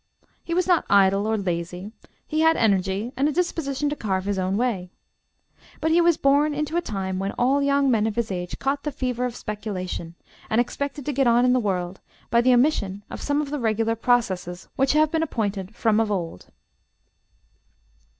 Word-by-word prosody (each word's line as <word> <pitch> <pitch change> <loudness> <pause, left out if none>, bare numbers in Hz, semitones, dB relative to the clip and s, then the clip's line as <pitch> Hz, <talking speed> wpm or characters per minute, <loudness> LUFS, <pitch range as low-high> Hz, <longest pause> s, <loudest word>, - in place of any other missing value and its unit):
He 335 - -3
was 365 - +2
not 355 -3 +3
idle 195 +1 +4
or 220 0 +1
lazy, 180 +1 -4 0.3
he 310 - -2
had 320 0 +4
energy 200 +1 +1
and 275 +4 +2
a - - -1
disposition 295 -4 -1
to - - -1
carve 190 -7 -2
his 200 -1 -1
own 185 +1 0
way. 215 -7 -1 0.9
But 320 +1 0
he 340 +2 +5
was 340 -2 +4
born 285 +2 +3
into 300 +2 -2
a 345 - +2
time 190 - -3
when 195 +1 -2
all 265 +3 +2
young 280 -1 +2
men 220 -2 +2
of 215 - -3
his 235 -3 -1
age 180 -1 -4
caught 275 +1 -1
the 295 - -3
fever 250 -2 -2
of 245 -2 -4
speculation, 185 -5 -5 0.3
and 220 - +2
expected 280 +3 -2
to 295 - -2
get 270 -1 +2
on 240 +1 +4
in 250 - +4
the 255 - +3
world 185 -4 -2 0.3
by 235 +1 +5
the 255 +1 +4
omission 240 -7 +2
of - - -7
some 290 +1 0
of 285 - -7
the 295 - -2
regular 225 -1 0
processes 190 -7 0
which 270 0 +2
have 310 0 +3
been 320 - +1
appointed 205 - -3
from 220 -2 +2
of 225 -1 +1
old. 170 - -4
235 Hz, 200 wpm, -24 LUFS, 195-280 Hz, 0.9 s, he